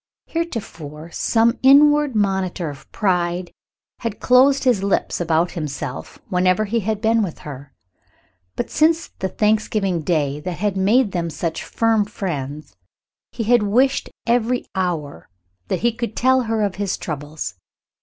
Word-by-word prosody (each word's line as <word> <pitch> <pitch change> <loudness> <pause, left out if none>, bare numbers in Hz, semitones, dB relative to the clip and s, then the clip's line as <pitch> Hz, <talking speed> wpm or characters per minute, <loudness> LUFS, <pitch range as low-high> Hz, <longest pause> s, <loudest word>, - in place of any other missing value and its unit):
Heretofore, 170 - -5
some 230 +5 +2
inward 290 0 +5
monitor 190 -5 0
of 140 - -14
pride 180 -3 0 0.5
had 230 -3 -4
closed 265 +2 +4
his 245 -7 +3
lips 195 -2 0
about 170 +1 +1
himself 145 -4 -5
whenever 185 +3 +2
he 230 +3 0
had 215 0 -2
been 225 0 +3
with 185 -6 -3
her, 140 -1 -9 0.8
but, - - -3
since 325 +2 +2
the 190 - -1
Thanksgiving 210 -4 +1
Day 150 -3 0
that 175 +3 -5
had 205 0 -1
made 205 +4 +3
them 170 -2 -2
such 165 0 -3
firm 225 -2 +1
friends, 150 - -5 0.6
he 230 - -4
had 240 +1 +4
wished 245 +7 +2 0.2
every 245 +1 +1
hour 165 - -3 0.4
that - - -2
he 235 - +3
could 230 -1 -5
tell 260 +1 +3
her 220 -1 +1
of 200 -2 -2
his 200 -2 -1
troubles. 145 - -5
195 Hz, 145 wpm, -21 LUFS, 165-230 Hz, 0.8 s, inward